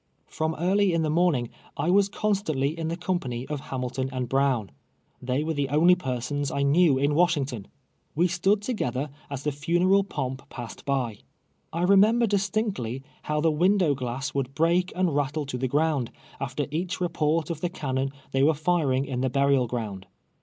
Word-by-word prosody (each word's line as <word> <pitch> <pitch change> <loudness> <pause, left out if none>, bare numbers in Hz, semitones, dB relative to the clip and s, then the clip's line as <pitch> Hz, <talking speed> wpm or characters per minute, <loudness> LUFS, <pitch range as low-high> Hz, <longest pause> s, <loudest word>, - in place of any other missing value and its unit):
From 160 0 -2
early 190 +3 +2
in 165 -1 +1
the 155 - 0
morning, 155 -8 +2 0.3
I 155 +5 +1
was 200 +1 +4
constantly 175 -10 0
in 165 -1 -3
the 165 +1 -2
company 135 -10 -2
of 150 -1 -3
Hamilton 130 0 -3
and 130 -2 -3
Brown. 135 -5 +1 0.5
They 130 +3 -1
were 160 +1 -1
the 145 -2 -1
only 160 +6 +5
persons 140 -2 -2
I 140 - -1
knew 145 0 +4
in 140 +2 +2
Washington. 145 - +1 0.2
' - - -44
We 170 +4 +3
stood 190 +4 +1
to 250 - -1
gether 135 - -2 0.2
as 140 -1 -5
the 150 - 0
funeral 175 +7 +2
pomp 135 -8 -5
])assed 120 -2 -8
by. 125 -6 -1 0.5
I 170 +2 -2
remember 210 +5 +5
distinctly 195 - -1 0.2
how 150 0 -1
the 160 0 +3
window 175 0 +3
glass 130 0 -4
would 135 -1 -2
break 170 +3 +2
and 180 -5 +1
rattle 145 +1 0
to 135 -2 -4
the 130 - 0
ground, 145 -2 +1 0.3
after 135 +2 -2
each 175 +4 -2
report 165 -2 0
of 160 -2 -5
the 175 - 0
cann.on 135 -5 -2 0.2
they 135 - +1
vrere 150 +3 +4
iiaingin 140 -6 +1
the 130 - +1
burial 140 -1 +2
ground. 105 -5 -5
150 Hz, 180 wpm, -26 LUFS, 130-175 Hz, 0.5 s, only